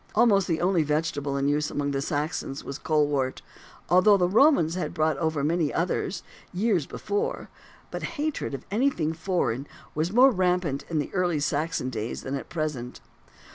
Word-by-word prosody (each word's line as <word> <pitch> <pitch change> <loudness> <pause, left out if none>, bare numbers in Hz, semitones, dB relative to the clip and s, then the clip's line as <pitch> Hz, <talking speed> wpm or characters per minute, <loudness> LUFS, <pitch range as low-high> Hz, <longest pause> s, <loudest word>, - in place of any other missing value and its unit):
Almost 210 -4 +4
the 165 -2 0
only 180 -1 +3
vegetable 150 -2 -1
in 140 0 0
use 150 +1 +1
amongst 145 -1 -2
the 135 - -1
Saxons 145 -1 -3
was 140 - -6
colewort, 145 -4 0 0.4
although 185 +3 +6
the 180 -2 +2
Romans 210 - +4
had 170 -3 -3
brought 155 -2 +2
over 160 -3 -1
many 160 0 +1
others, 175 +1 -1 0.3
years 185 -5 +1
before; 205 -1 -3 0.4
but - - -4 0.2
hatred 295 - -2
of 130 - -9
anything 205 - +1
foreign 160 -6 -1 0.3
was 160 +4 -1
more 255 +5 +6
rampant 180 - 0
in 155 -4 -1
early 180 -4 +1
Saxon 145 -2 -1
days 110 0 -4
than 135 - -4
at 140 - -4
present. 150 -7 -4
160 Hz, 160 wpm, -26 LUFS, 145-185 Hz, 0.4 s, although